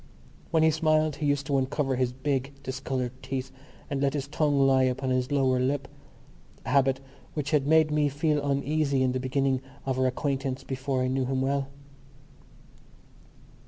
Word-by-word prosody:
When 160 Hz, -2 st, +3 dB
he 160 Hz, -, +5 dB
smiled 155 Hz, -1 st, +2 dB
he 150 Hz, -, -1 dB
used 145 Hz, -1 st, +1 dB
to 140 Hz, -1 st, +1 dB
uncover 135 Hz, 0 st, 0 dB
his 125 Hz, -1 st, 0 dB
big 135 Hz, +1 st, -2 dB
discoloured 130 Hz, -1 st, -3 dB
teeth 130 Hz, -1 st, -4 dB, 0.4 s
and 140 Hz, -1 st, -2 dB
let 140 Hz, 0 st, +1 dB
his 140 Hz, -1 st, -2 dB
tongue 145 Hz, -1 st, +1 dB
lie 135 Hz, -1 st, +4 dB
upon 130 Hz, 0 st, 0 dB
his 130 Hz, 0 st, 0 dB
lower 130 Hz, -3 st, +2 dB
lip—a 135 Hz, +1 st, -6 dB
habit 135 Hz, -1 st, +3 dB, 0.4 s
which 145 Hz, -2 st, -2 dB
had 145 Hz, -3 st, +2 dB
made 160 Hz, 0 st, +4 dB
me 150 Hz, -1 st, +2 dB
feel 150 Hz, +1 st, 0 dB
uneasy 140 Hz, 0 st, +1 dB
in 130 Hz, -, +2 dB
the 130 Hz, -, -1 dB
beginning 130 Hz, 0 st, 0 dB, 0.2 s
of 130 Hz, -1 st, -1 dB
our 130 Hz, -, +3 dB
acquaintance 135 Hz, 0 st, -2 dB
before 130 Hz, 0 st, -2 dB
I -, -, +1 dB
knew 130 Hz, 0 st, 0 dB
him 130 Hz, +1 st, -1 dB
well. 135 Hz, 0 st, 0 dB
135 Hz, 165 wpm, -27 LUFS, 130-145 Hz, 0.4 s, he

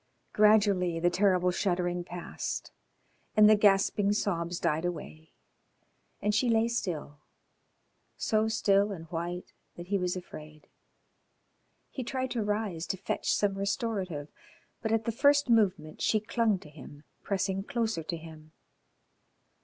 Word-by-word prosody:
Gradually 205 Hz, -5 st, +4 dB
the 175 Hz, +1 st, +2 dB
terrible 180 Hz, -1 st, +3 dB
shuddering 175 Hz, -1 st, -1 dB
passed 175 Hz, 0 st, -5 dB, 0.7 s
and 210 Hz, 0 st, +8 dB
the 215 Hz, -, +7 dB
gasping 205 Hz, 0 st, +3 dB
sobs 175 Hz, -4 st, -1 dB
died 155 Hz, +2 st, 0 dB
away, 160 Hz, -2 st, -6 dB, 0.9 s
and 210 Hz, -, +1 dB
she 240 Hz, +3 st, +2 dB
lay 225 Hz, 0 st, +3 dB
still, 165 Hz, -10 st, -3 dB, 1.0 s
so 215 Hz, 0 st, +1 dB
still 205 Hz, -2 st, +2 dB
and 165 Hz, -4 st, -7 dB
white 175 Hz, +1 st, -4 dB, 0.2 s
that 175 Hz, +1 st, -10 dB
he 200 Hz, -1 st, +1 dB
was 180 Hz, 0 st, -1 dB
afraid. 155 Hz, -4 st, -10 dB, 1.2 s
He 260 Hz, -, -4 dB
tried 260 Hz, +1 st, -3 dB
to 235 Hz, -, -1 dB
rise 205 Hz, -5 st, -2 dB
to 190 Hz, -, -2 dB
fetch 190 Hz, -, -2 dB
some 205 Hz, -1 st, +2 dB
restorative, 195 Hz, -, -2 dB, 0.5 s
but 220 Hz, -, -2 dB
at 225 Hz, -1 st, +1 dB
the 230 Hz, -, 0 dB
first 285 Hz, +2 st, +3 dB
movement 185 Hz, -9 st, +1 dB
she 215 Hz, -, +2 dB
clung 220 Hz, -1 st, +1 dB
to 150 Hz, -, -13 dB
him, 145 Hz, 0 st, -12 dB, 0.2 s
pressing 195 Hz, -1 st, -1 dB
closer 225 Hz, -7 st, -1 dB
to 165 Hz, +2 st, -4 dB
him. 160 Hz, -1 st, -13 dB
195 Hz, 135 wpm, -29 LUFS, 175-215 Hz, 1.2 s, and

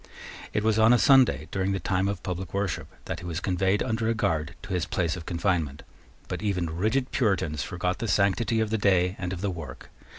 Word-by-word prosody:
It 105 Hz, -, 0 dB
was 110 Hz, 0 st, +2 dB
on 110 Hz, +2 st, +6 dB
a -, -, +6 dB
Sunday, 125 Hz, -, +5 dB
during 95 Hz, 0 st, 0 dB
the 95 Hz, -, -1 dB
time 95 Hz, 0 st, 0 dB
of 100 Hz, -2 st, -3 dB
public 90 Hz, 0 st, -4 dB
worship, 100 Hz, -4 st, -2 dB, 0.2 s
that -, -, -4 dB
he 85 Hz, -, -10 dB
was 85 Hz, -1 st, -3 dB
conveyed 95 Hz, +2 st, +1 dB
under 110 Hz, -2 st, -1 dB
a 115 Hz, -, +1 dB
guard 80 Hz, -8 st, -1 dB
to 105 Hz, -2 st, -5 dB
his 90 Hz, -2 st, -1 dB
place 85 Hz, -2 st, 0 dB
of 85 Hz, -3 st, -9 dB
confinement: 85 Hz, -5 st, -1 dB, 0.4 s
but -, -, -4 dB
even 90 Hz, -6 st, -1 dB
rigid 110 Hz, +9 st, 0 dB
Puritans 90 Hz, -, 0 dB
forgot 90 Hz, +5 st, -2 dB
the 115 Hz, -, -2 dB
sanctity 105 Hz, +4 st, +2 dB
of 110 Hz, -1 st, -1 dB
the 110 Hz, -, +1 dB
day 95 Hz, -2 st, +3 dB
and 90 Hz, -2 st, -3 dB
of 95 Hz, -2 st, -5 dB
the 100 Hz, -1 st, 0 dB
work. 80 Hz, -8 st, -9 dB
95 Hz, 220 wpm, -27 LUFS, 90-105 Hz, 0.4 s, on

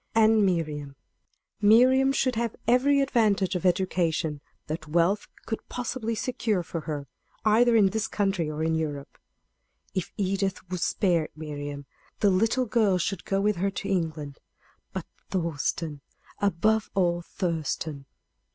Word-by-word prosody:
And 220 Hz, -1 st, +5 dB
Miriam 150 Hz, -6 st, -1 dB, 0.7 s
Miriam 255 Hz, +6 st, +6 dB
should 260 Hz, -2 st, +1 dB
have 230 Hz, -1 st, -2 dB
every 275 Hz, +4 st, +4 dB
advantage 210 Hz, -8 st, +2 dB
of 180 Hz, 0 st, +1 dB
education 170 Hz, -4 st, 0 dB, 0.2 s
that 155 Hz, 0 st, -5 dB
wealth 170 Hz, +6 st, +2 dB, 0.2 s
could 225 Hz, -, -5 dB
possibly 235 Hz, -2 st, -3 dB
secure 220 Hz, -5 st, -1 dB
for 165 Hz, 0 st, -5 dB
her, 145 Hz, -2 st, -3 dB, 0.4 s
either 230 Hz, +2 st, +5 dB
in 200 Hz, -4 st, +5 dB
this 220 Hz, 0 st, -1 dB
country 195 Hz, -6 st, 0 dB
or 155 Hz, +1 st, -3 dB
in 160 Hz, 0 st, +1 dB
Europe. 150 Hz, -3 st, -3 dB, 0.7 s
If 185 Hz, -, -3 dB
Edith 195 Hz, -1 st, -1 dB
would 180 Hz, -, -2 dB
spare 170 Hz, -6 st, +1 dB
Miriam, 145 Hz, -2 st, -6 dB, 0.3 s
the 205 Hz, -2 st, +4 dB
little 225 Hz, +7 st, +2 dB
girl 215 Hz, -5 st, +2 dB
should 180 Hz, +1 st, -2 dB
go 195 Hz, -, 0 dB
with 210 Hz, -1 st, +1 dB
her 195 Hz, +3 st, +1 dB
to 195 Hz, 0 st, -5 dB
England. 155 Hz, -6 st, -2 dB, 0.5 s
But -, -, -5 dB, 0.2 s
Thurston 160 Hz, -3 st, -2 dB, 0.4 s
above 205 Hz, +3 st, +2 dB
all, 175 Hz, -2 st, +2 dB
Thurston! 160 Hz, -5 st, -3 dB
190 Hz, 135 wpm, -27 LUFS, 160-220 Hz, 0.7 s, Miriam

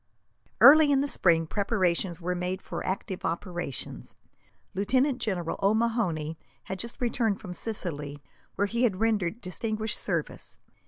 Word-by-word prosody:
Early 300 Hz, 0 st, +9 dB
in 275 Hz, -1 st, +4 dB
the 285 Hz, -, 0 dB
spring 165 Hz, -10 st, +3 dB
preparations 185 Hz, -2 st, 0 dB
were 180 Hz, +1 st, -2 dB
made 180 Hz, +1 st, -2 dB
for -, -, -5 dB
active 190 Hz, 0 st, -3 dB
operations. 170 Hz, -, -4 dB, 0.6 s
Lieutenant 255 Hz, +7 st, +1 dB
General 180 Hz, -7 st, -2 dB
O'Mahony 195 Hz, -7 st, +1 dB, 0.2 s
had 190 Hz, 0 st, -6 dB
just 235 Hz, 0 st, -4 dB
returned 230 Hz, -4 st, 0 dB
from 185 Hz, -5 st, -7 dB
Sicily, 150 Hz, -9 st, -5 dB, 0.3 s
where 200 Hz, -, +1 dB
he 235 Hz, +4 st, -2 dB
had 210 Hz, -7 st, +2 dB
rendered 220 Hz, -2 st, 0 dB
distinguished 215 Hz, +3 st, -2 dB
service. -, -, -3 dB
195 Hz, 130 wpm, -28 LUFS, 175-230 Hz, 0.6 s, Early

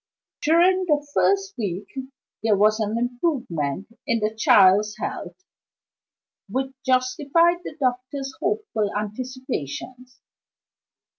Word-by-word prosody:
During 360 Hz, +4 st, +4 dB
the 295 Hz, -3 st, +1 dB
first 395 Hz, 0 st, +2 dB
week 195 Hz, -2 st, -3 dB, 0.6 s
there 215 Hz, -2 st, +3 dB
was 215 Hz, +2 st, +4 dB
an 215 Hz, +1 st, -1 dB
improvement 240 Hz, -, -1 dB, 0.2 s
in 230 Hz, -, +2 dB
the 215 Hz, 0 st, -1 dB
child's 210 Hz, 0 st, +5 dB
health, -, -, -5 dB, 1.1 s
which 265 Hz, +5 st, -2 dB
justified 280 Hz, +6 st, +2 dB
the 300 Hz, -, -8 dB
doctor's 260 Hz, +1 st, -2 dB
hopeful 235 Hz, -, -1 dB
anticipations. 250 Hz, -, -5 dB
250 Hz, 95 wpm, -24 LUFS, 210-290 Hz, 1.1 s, child's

